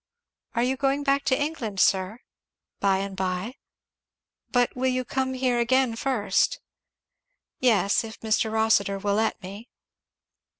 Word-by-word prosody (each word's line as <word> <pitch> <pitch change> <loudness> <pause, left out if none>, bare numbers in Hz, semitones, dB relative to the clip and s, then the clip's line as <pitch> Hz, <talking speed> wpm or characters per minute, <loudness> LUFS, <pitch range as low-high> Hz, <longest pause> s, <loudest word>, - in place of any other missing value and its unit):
"Are 235 - +2
you 260 +2 0
going 275 +1 0
back 275 0 +1
to 260 0 +2
England, 275 -10 -3
sir?" 190 +6 +2 0.6
"By 195 -1 +2
and 195 0 -4
by." 185 +4 -2 1.0
"But 245 -1 +2
you 250 - -7
will 255 -1 0
come 260 +1 -2
here 250 -2 +1
again 250 0 +2
first?" 260 - 0 1.0
"Yes 215 -6 +3
if 225 0 -9
Mr. 220 0 +1
Rossitur 220 -3 +2
will 200 +1 -1
let 220 +2 0
me." 200 +6 -9
230 Hz, 135 wpm, -25 LUFS, 200-260 Hz, 1.0 s, Yes